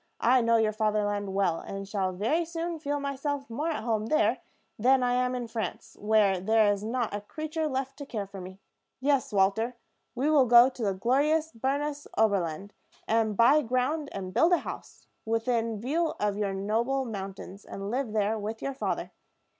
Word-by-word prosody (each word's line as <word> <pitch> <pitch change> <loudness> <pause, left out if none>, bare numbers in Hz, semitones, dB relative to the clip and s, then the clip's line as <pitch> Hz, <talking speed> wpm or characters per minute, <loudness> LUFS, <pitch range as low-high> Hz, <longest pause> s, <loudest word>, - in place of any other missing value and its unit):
"I 250 +2 +4
know 230 0 +3
your 220 -1 +2
fatherland 205 -2 -1
well, 185 -4 +1
and 195 0 -7
shall 195 -2 -1
very 230 - 0
soon 335 0 -4
feel 290 -1 -2
myself 280 0 -3
more 295 +8 -2
at 295 -9 -3
home 220 -2 -1
there 230 -3 +2 0.4
than 255 +3 +4
I 245 0 +2
am 250 0 +1
in 245 -1 -3
France, 225 0 -5
where 210 -3 +3
there 215 +2 +3
is 200 0 -6
not 235 0 -2
a 205 - -3
creature 310 +8 -3
left 270 -1 -3
to 285 - -8
care 210 -6 -3
for 195 -1 -9
me. 185 +1 -9 0.4
Yes, 275 -1 +1
Walter, 210 +5 +1 0.4
we 260 +4 0
will 290 -4 +4
go 240 +2 +8
to 255 - -11
the 200 -2 0
glorious 295 +10 +1
Bernese 285 +4 -2
Oberland, 200 -3 0 0.3
and 220 -2 +1
buy 275 +6 +6
ground, 270 +4 -1
and 185 -2 -6
build 340 +2 +4
a - - +6
house, - - -8 0.2
within 225 -1 0
view 315 +8 -1
of 205 -1 0
your 200 -2 -1
noble 230 +7 0
mountains, 195 -2 -7
and 195 +1 -6
live 250 -2 -1
there 215 0 0
with 215 +2 -4
your 275 - -2
father. 265 - -3
230 Hz, 185 wpm, -28 LUFS, 205-275 Hz, 0.4 s, go